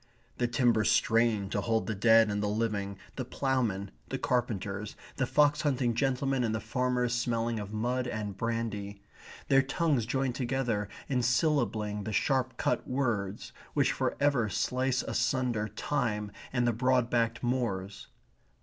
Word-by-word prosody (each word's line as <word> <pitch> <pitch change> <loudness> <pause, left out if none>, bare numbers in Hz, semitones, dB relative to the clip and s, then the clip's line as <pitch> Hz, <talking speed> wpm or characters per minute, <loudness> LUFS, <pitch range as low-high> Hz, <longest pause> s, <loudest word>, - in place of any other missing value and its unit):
The 120 - +2
timbers 120 -2 +2
strain 115 -3 +3
to - - 0
hold 115 -1 0
the 110 - -2
dead 110 +1 +5
and 105 0 -1
the 105 - 0
living, 105 -2 -1 0.2
the 130 - -1
ploughmen, 120 -7 -1 0.2
the - - -2
carpenters, 105 -4 -2 0.2
the 135 -3 +1
fox 150 +1 +3
hunting 130 -5 +1
gentlemen 135 +1 0
and 110 -2 0
the - - -1
farmers 125 +1 0
smelling 115 -2 0
of 105 -1 -6
mud 125 +4 -1
and 105 -4 -4
brandy. 105 -3 -3 0.4
Their 135 -1 +5
tongues 135 -3 0
join 130 0 0
together 120 -5 -1 0.2
in 130 -2 +1
syllabling 120 -5 +1
the 110 - -3
sharp 130 0 +1
cut 125 - 0
words, 110 -7 -2 0.2
which - - +3
for - - -1
ever 140 -6 +2
slice 130 +4 0
asunder 125 -5 0
time 105 -2 -2 0.2
and 120 -2 +1
the 120 - +2
broad 125 +1 +2
backed 115 -1 +1
moors. 100 -6 -2
120 Hz, 150 wpm, -30 LUFS, 105-130 Hz, 0.4 s, dead